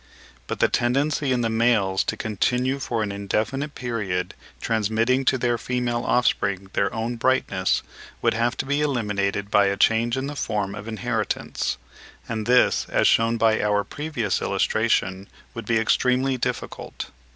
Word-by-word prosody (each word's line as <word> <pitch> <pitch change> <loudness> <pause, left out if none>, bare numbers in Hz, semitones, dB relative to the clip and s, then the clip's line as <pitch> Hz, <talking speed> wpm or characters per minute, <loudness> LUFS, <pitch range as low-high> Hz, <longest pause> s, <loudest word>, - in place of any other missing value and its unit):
But - - -3
the - - +4
tendency 140 +3 +1
in 125 -1 +1
the 115 - +1
males 110 -5 +2
to - - -2
continue 125 +5 0
for 115 -4 -1
an 105 - -3
indefinite 110 +9 -2
period 100 -8 -3 0.3
transmitting 115 +4 +1
to 130 - +3
their 120 -1 0
female 125 -1 -1
offspring 100 -6 +1
their 100 - +1
own 115 +2 -3
brightness, 130 +3 +1 0.4
would - - +2
have 120 +3 0
to - - -2
be 145 +2 0
eliminated 105 -7 -1
by 100 -1 +5
a 100 0 0
change 115 +4 +2
in 130 - -2
the 145 +1 -5
form 100 -7 -2
of 105 +1 -8
inheritance; 110 -1 -2 0.5
and 110 -1 -3
this, 125 0 +4
as - - +3
shewn 115 +1 +3
by 110 -1 +3
our 105 -1 +1
previous 140 - -2
illustration, 100 -4 0 0.3
would 115 -3 -7
be 115 - +2
extremely 125 +4 +2
difficult. 125 - -4
115 Hz, 155 wpm, -24 LUFS, 105-125 Hz, 0.5 s, by